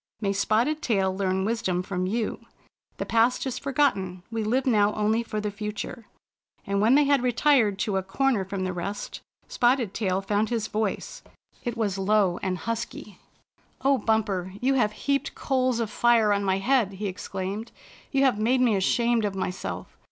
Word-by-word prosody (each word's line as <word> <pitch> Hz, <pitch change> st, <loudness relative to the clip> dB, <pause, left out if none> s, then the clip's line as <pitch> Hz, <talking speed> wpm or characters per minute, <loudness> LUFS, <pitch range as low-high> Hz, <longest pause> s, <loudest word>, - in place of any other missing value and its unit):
May 200 Hz, -2 st, 0 dB
Spotted 230 Hz, +10 st, +1 dB
Tail 195 Hz, -, +1 dB
learn 190 Hz, -1 st, 0 dB
wisdom 190 Hz, -5 st, -1 dB
from 185 Hz, -1 st, -2 dB
you. 220 Hz, +3 st, -2 dB, 0.6 s
The -, -, -3 dB
past 230 Hz, +3 st, +2 dB
is 255 Hz, -2 st, -3 dB
for 275 Hz, -, -4 dB
gotten. 190 Hz, -11 st, +1 dB
We 225 Hz, -1 st, -2 dB
live 250 Hz, +5 st, +1 dB
now 210 Hz, -4 st, +3 dB
only 215 Hz, +2 st, +1 dB
for 215 Hz, -2 st, -4 dB
the 210 Hz, 0 st, -2 dB
future." 210 Hz, +2 st, -6 dB, 0.6 s
And 200 Hz, 0 st, 0 dB
when 230 Hz, +5 st, +5 dB
they 295 Hz, -, +6 dB
had 280 Hz, -2 st, +3 dB
retired 245 Hz, -4 st, +3 dB
to 200 Hz, -2 st, 0 dB
a -, -, +1 dB
corner 220 Hz, +3 st, 0 dB
from 190 Hz, 0 st, -4 dB
the 185 Hz, 0 st, -2 dB
rest, 190 Hz, +4 st, -5 dB, 0.3 s
Spotted 240 Hz, -4 st, +1 dB
Tail 190 Hz, -3 st, 0 dB
found 205 Hz, +2 st, 0 dB
his 230 Hz, -3 st, -1 dB
voice. 215 Hz, -, -3 dB, 0.4 s
It 240 Hz, -2 st, -3 dB
was 200 Hz, -4 st, -1 dB
low 195 Hz, -2 st, +2 dB
and 185 Hz, -1 st, -1 dB
husky. 230 Hz, -2 st, -5 dB, 0.3 s
" -, -, -37 dB
O 275 Hz, -1 st, +4 dB
Bumper, 205 Hz, -5 st, 0 dB
you 265 Hz, +2 st, +2 dB
have 215 Hz, -6 st, +2 dB
heaped 280 Hz, -1 st, 0 dB
coals 255 Hz, -3 st, 0 dB
of 225 Hz, -2 st, -2 dB
fire 230 Hz, -2 st, +4 dB
on 200 Hz, 0 st, 0 dB
my 190 Hz, -1 st, +1 dB
head!" 225 Hz, -1 st, +2 dB
he 200 Hz, +2 st, -5 dB
exclaimed. 195 Hz, +3 st, -4 dB, 0.4 s
"You 275 Hz, -1 st, +2 dB
have 255 Hz, -6 st, +3 dB
made 245 Hz, +4 st, +2 dB
me 240 Hz, -4 st, +3 dB
ashamed 235 Hz, +4 st, +2 dB
of 205 Hz, -2 st, -1 dB
myself. 185 Hz, -1 st, -5 dB
215 Hz, 180 wpm, -26 LUFS, 195-240 Hz, 0.6 s, they